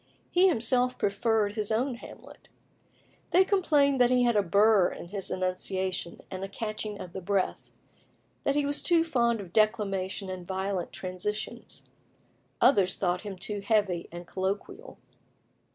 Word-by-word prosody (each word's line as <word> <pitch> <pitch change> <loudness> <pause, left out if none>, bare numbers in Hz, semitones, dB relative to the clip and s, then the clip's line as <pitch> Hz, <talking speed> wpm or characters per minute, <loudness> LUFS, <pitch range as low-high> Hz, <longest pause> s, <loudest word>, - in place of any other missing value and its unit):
He 360 +2 +5
himself 250 -4 +2
preferred 205 +1 +1
his 215 -1 -2
own 250 +5 +1
Hamlet. 235 - -13 0.8
They 375 +2 +5
complained 290 -9 +3
that 245 - +6
he 250 0 +3
had 240 -2 +2
a 205 - +5
burr 200 +1 +4
in 170 - -9
his 195 -1 -4
enunciation, 185 -1 -2
and 190 0 -5
a - - -3
catching 215 0 -5
of 180 - -8
the 190 - -5
breath 195 +1 -1 0.7
that 280 - +1
he 290 -1 +2
was 285 +1 0
too 335 -2 +3
fond 235 -8 +1
of 185 -3 -9
declamation 205 -3 +1
and 185 -1 -6
violent 190 -1 -2
transitions; 190 +3 -5 0.7
others 200 -8 +4
thought 180 -1 0
him 200 -3 -7
too 205 +3 -4
heavy 200 -5 0
and 175 +1 -8
colloquial. 190 +3 -4
205 Hz, 150 wpm, -28 LUFS, 190-240 Hz, 0.8 s, that